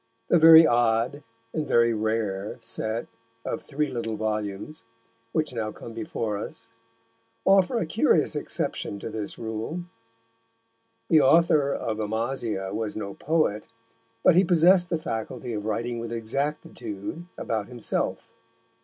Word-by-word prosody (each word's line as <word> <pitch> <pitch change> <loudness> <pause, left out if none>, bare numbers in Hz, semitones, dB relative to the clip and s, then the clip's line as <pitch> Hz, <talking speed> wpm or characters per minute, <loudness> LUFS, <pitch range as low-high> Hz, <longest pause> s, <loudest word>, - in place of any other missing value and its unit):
The 175 - +5
very 160 0 +10
odd 120 +2 +2 0.3
and 155 -2 -2
very 115 0 +4
rare 110 -2 -2
set 115 0 -3 0.4
of - - -3
three 150 +1 -2
little 115 -3 -3
volumes, 105 +5 -3 0.5
which 155 -1 -1
now 110 -2 -2
come 115 - -10
before 110 -2 -3
us, - - -8 0.7
offer 195 +5 +4
a 225 - 0
curious 160 - +2
exception 100 - -3
to 105 - -6
this 105 -2 -5
rule. 115 +10 -4 1.2
The 160 -2 +5
author 155 -1 +4
of 110 -5 -3
Amasia 110 -2 -2
was 110 0 -3
no 100 -2 -5
poet, 155 -9 0 0.6
but - - +7
he 180 +3 +5
possessed 175 +1 +5
the 165 - +1
faculty 120 -3 -4
of 105 -1 -4
writing 115 +2 -2
with 115 0 -5
exactitude 125 - -4
about 110 -3 -2
himself. 120 -2 -3
115 Hz, 130 wpm, -26 LUFS, 110-155 Hz, 1.2 s, very